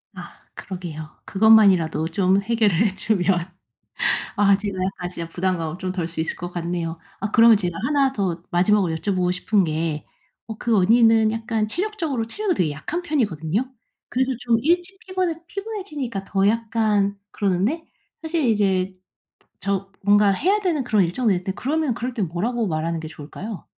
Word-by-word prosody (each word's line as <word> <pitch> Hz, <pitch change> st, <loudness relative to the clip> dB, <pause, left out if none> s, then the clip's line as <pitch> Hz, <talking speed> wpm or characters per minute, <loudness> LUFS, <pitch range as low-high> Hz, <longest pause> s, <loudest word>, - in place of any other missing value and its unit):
아 -, -, -11 dB
그러게요. 170 Hz, -5 st, -7 dB, 0.2 s
그것만이라도 190 Hz, -7 st, +4 dB
좀 190 Hz, +3 st, +2 dB
해결을 215 Hz, -3 st, +2 dB
해 205 Hz, 0 st, +2 dB
주면 195 Hz, -2 st, 0 dB, 1.1 s
아 200 Hz, -1 st, +4 dB
제가 200 Hz, -2 st, -4 dB, 0.2 s
아 180 Hz, -, -3 dB
진짜 170 Hz, -2 st, -6 dB
부담감을 175 Hz, -2 st, -2 dB
좀 185 Hz, -1 st, -3 dB
덜 180 Hz, -3 st, -2 dB
수 165 Hz, -1 st, -1 dB
있을 160 Hz, -, -3 dB
것 175 Hz, 0 st, -6 dB
같네요. 170 Hz, -1 st, -3 dB, 0.2 s
아 205 Hz, +1 st, -3 dB
그러면 230 Hz, -2 st, +7 dB
제가 175 Hz, -4 st, -3 dB
1 275 Hz, -1 st, +2 dB
더 180 Hz, -7 st, -2 dB
마지막으로 180 Hz, -1 st, +2 dB
여쭤보고 180 Hz, +1 st, 0 dB
싶은 195 Hz, +2 st, +1 dB
게 155 Hz, -1 st, -2 dB, 0.4 s
어 220 Hz, -1 st, -6 dB
그 235 Hz, 0 st, +1 dB
언니는 225 Hz, +2 st, +5 dB
약간 225 Hz, -1 st, -1 dB
체력적으로 330 Hz, -, -2 dB
체력이 395 Hz, -, -1 dB
되게 160 Hz, -4 st, +1 dB
약한 225 Hz, -, -4 dB
편이거든요. 235 Hz, -, -1 dB, 0.4 s
그래서 260 Hz, +1 st, 0 dB
좀 235 Hz, -2 st, +2 dB
일찍 350 Hz, +5 st, 0 dB
피곤해 365 Hz, -3 st, -2 dB
피곤해지니까 320 Hz, -, -5 dB
더 195 Hz, 0 st, +1 dB
약간 215 Hz, -3 st, +1 dB
그러는데 205 Hz, -, 0 dB, 0.4 s
사실 325 Hz, -1 st, -1 dB
이제 195 Hz, -5 st, +1 dB, 0.7 s
저 195 Hz, 0 st, -2 dB
뭔가 205 Hz, 0 st, +5 dB
해야 375 Hz, -, +2 dB
되는 330 Hz, -8 st, 0 dB
그런 215 Hz, -5 st, +3 dB
일정도 215 Hz, +7 st, 0 dB
있는데 185 Hz, +1 st, -2 dB
그러면 295 Hz, +3 st, -1 dB
그럴 245 Hz, +1 st, -4 dB
땐 210 Hz, -6 st, -1 dB
뭐라고 225 Hz, +7 st, -1 dB
말하는 165 Hz, 0 st, -2 dB
게 160 Hz, -, -6 dB
좋을까요? 175 Hz, +6 st, -8 dB
205 Hz, 350 characters per minute, -22 LUFS, 180-245 Hz, 1.1 s, 그러면